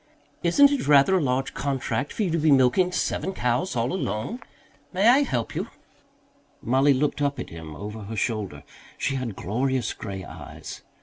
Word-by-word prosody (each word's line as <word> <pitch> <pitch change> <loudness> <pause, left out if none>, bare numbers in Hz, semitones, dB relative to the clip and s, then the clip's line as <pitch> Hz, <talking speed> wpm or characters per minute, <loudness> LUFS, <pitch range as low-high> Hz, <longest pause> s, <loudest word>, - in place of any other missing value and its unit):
"Isn't 280 +12 +5
it 280 - -1
rather 145 +6 +6
a - - +1
large 135 -1 0
contract 140 0 -2
for 220 - -2
you 180 - 0
to 165 - +1
be 155 +1 +3
milking 140 +7 +4
seven 190 +1 -1
cows 125 +5 -1
all 120 +6 0
alone? 185 - -3 0.5
May 195 +4 +3
I 250 +4 +7
help 125 - -1
you?" - - -3 0.9
Mollie 135 +4 +3
looked 145 +2 0
up 140 -1 0
at - - -6
him 80 -2 -8
over 105 +5 -7
her 110 +2 -7
shoulder. 105 - -2 0.3
She - - -1
had 125 -6 -3
glorious 125 +7 -1
grey 95 -4 -6
eyes. - - -9
135 Hz, 175 wpm, -25 LUFS, 115-170 Hz, 0.9 s, I